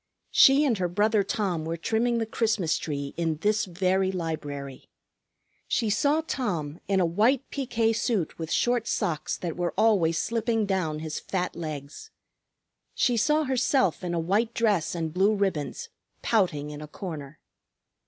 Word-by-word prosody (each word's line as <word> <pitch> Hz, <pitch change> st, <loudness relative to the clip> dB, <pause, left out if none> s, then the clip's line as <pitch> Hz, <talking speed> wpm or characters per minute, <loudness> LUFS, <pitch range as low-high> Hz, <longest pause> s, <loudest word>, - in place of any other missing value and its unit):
She 275 Hz, +3 st, +6 dB
and 235 Hz, -8 st, +1 dB
her 180 Hz, -, +1 dB
brother 210 Hz, +4 st, +2 dB
Tom 195 Hz, -5 st, -1 dB
were 165 Hz, +1 st, -3 dB
trimming 230 Hz, +7 st, 0 dB
the 225 Hz, -, 0 dB
Christmas 220 Hz, -7 st, 0 dB
tree 140 Hz, -2 st, -4 dB
in 165 Hz, -2 st, 0 dB
this 210 Hz, 0 st, +2 dB
very 190 Hz, +1 st, +1 dB
library. 145 Hz, -6 st, -5 dB, 0.8 s
She 225 Hz, -3 st, 0 dB
saw 285 Hz, +8 st, +2 dB
Tom, 170 Hz, -, -3 dB
in 195 Hz, -1 st, +2 dB
a 180 Hz, -, +3 dB
white 225 Hz, +10 st, +2 dB
piqué 230 Hz, -5 st, 0 dB
suit 215 Hz, -9 st, -1 dB
with 160 Hz, 0 st, -5 dB
short 240 Hz, -2 st, +1 dB
socks 155 Hz, -3 st, -1 dB
that 170 Hz, -3 st, -4 dB
were 175 Hz, -1 st, -2 dB
always 195 Hz, -7 st, +3 dB
slipping 225 Hz, +1 st, 0 dB
down 185 Hz, -6 st, -1 dB
his 155 Hz, -1 st, -4 dB
fat 180 Hz, -2 st, -3 dB
legs. 150 Hz, -3 st, -7 dB, 0.9 s
She 245 Hz, -, +2 dB
saw 300 Hz, +7 st, +2 dB
herself 260 Hz, -, +1 dB
in 175 Hz, -1 st, -2 dB
a -, -, 0 dB
white 210 Hz, +8 st, 0 dB
dress 205 Hz, -8 st, +1 dB
and 160 Hz, -2 st, -3 dB
blue 195 Hz, +4 st, +3 dB
ribbons, 200 Hz, -, -2 dB, 0.3 s
pouting 160 Hz, -10 st, +1 dB
in 150 Hz, 0 st, -8 dB
a 150 Hz, -, -7 dB
corner. 155 Hz, -4 st, -7 dB
190 Hz, 155 wpm, -27 LUFS, 160-225 Hz, 0.9 s, She